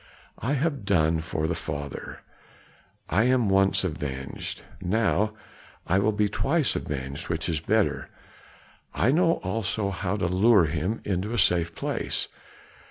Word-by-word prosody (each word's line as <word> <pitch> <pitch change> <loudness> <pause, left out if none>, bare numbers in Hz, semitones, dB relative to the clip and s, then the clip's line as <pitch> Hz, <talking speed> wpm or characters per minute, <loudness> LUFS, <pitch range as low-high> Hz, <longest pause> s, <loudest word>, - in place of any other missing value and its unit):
"I 130 +5 -1
have 140 -3 0
done 80 -5 +2
for 80 -1 -2
the 85 - 0
father, 70 -3 -6 0.9
I 100 +7 +2
am 125 -4 +3
once 95 0 +3
avenged; 70 -6 -4 0.2
now 105 +2 +1 0.5
I 95 +3 +2
will 105 +2 +2
be 105 0 +1
twice 140 +7 +1
avenged, 70 +2 -4
which 80 -1 -1
is 80 -4 0
better. 105 +6 +1 0.9
I 120 - +3
know 165 +2 +4
also 100 +1 -1
how 95 +1 -2
to 100 - -1
lure 95 +2 +5
him 85 +8 -2
into 100 +4 -1
a - - -1
safe 90 -4 +2
place. - - -2
95 Hz, 140 wpm, -26 LUFS, 80-110 Hz, 0.9 s, lure